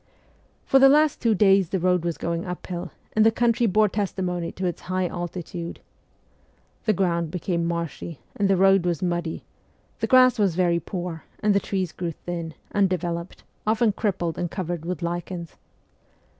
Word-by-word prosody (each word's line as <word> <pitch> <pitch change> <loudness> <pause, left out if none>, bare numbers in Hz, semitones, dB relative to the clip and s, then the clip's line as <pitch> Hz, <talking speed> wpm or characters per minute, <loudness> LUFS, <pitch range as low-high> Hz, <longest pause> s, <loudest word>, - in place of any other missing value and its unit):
For 270 - +5
the 270 0 +8
last 300 +1 +4
two 230 -3 +3
days 195 -3 +4
the 190 - 0
road 180 -1 +2
was 170 -2 -2
going 170 0 -2
up 180 -1 -6
hill, 175 0 -5 0.2
and 215 - +4
the 225 - +7
country 235 +1 +2
bore 215 +2 +4
testimony 185 -4 -2
to 185 - -4
its 175 - -2
high 185 0 +1
altitude. 175 0 -5 1.1
The 215 - +3
ground 170 -3 0
became 170 0 -1
marshy, 170 -2 -4 0.2
and 200 -1 +1
the 195 - +4
road 195 0 +5
was 175 -1 -1
muddy; 175 -2 -2 0.6
the - - 0
grass 255 -2 +6
was 195 -5 +2
very 175 -2 +2
poor, 175 -3 -5 0.2
and 210 -1 +3
the 200 - +4
trees 190 -4 -2
grew 170 -2 -4
thin, 170 -1 -6 0.2
un 200 -1 +3
developed, 170 -1 -3 0.2
often 220 0 +3
crippled 180 -6 -2
and 175 - -1
covered 175 -3 -4
with 180 0 -3
lichens. 170 0 -4
180 Hz, 170 wpm, -24 LUFS, 170-200 Hz, 1.1 s, the